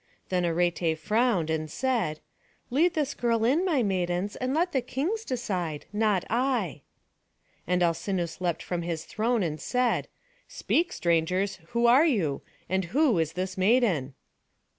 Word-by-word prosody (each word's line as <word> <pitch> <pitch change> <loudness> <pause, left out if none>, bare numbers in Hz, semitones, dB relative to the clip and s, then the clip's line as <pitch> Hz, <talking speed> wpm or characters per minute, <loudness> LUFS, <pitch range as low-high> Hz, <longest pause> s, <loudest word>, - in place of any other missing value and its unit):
Then 180 -1 +1
Arete 170 -1 +1
frowned, 205 -1 +1
and 155 -1 -2
said: 235 -8 -1 0.5
"Lead 325 +7 +3
this 295 -3 0
girl 230 -2 +1
in, 285 +9 +3
my 315 -10 +2
maidens; 185 0 -1
and 255 0 -2
let 340 +5 +1
the 265 -5 +1
kings 310 - -2
decide, 185 - -3
not 210 -4 +1
I." 240 - 0 0.9
And 180 0 +2
Alcinous 175 0 -1
leapt 175 -3 -1
up - - -17
from 175 -1 -2
his 165 -2 -4
throne, 225 0 0
and 155 -2 -3
cried, 250 -1 +1 0.4
"Speak, 340 +2 0
strangers, 180 +4 0
who 235 +4 0
are 260 +7 +6
you? 175 - 0 0.3
And 190 0 0
who 250 - +2
is 160 -1 0
this 185 +1 -4
maiden?" 190 - +2
195 Hz, 150 wpm, -27 LUFS, 170-250 Hz, 0.9 s, are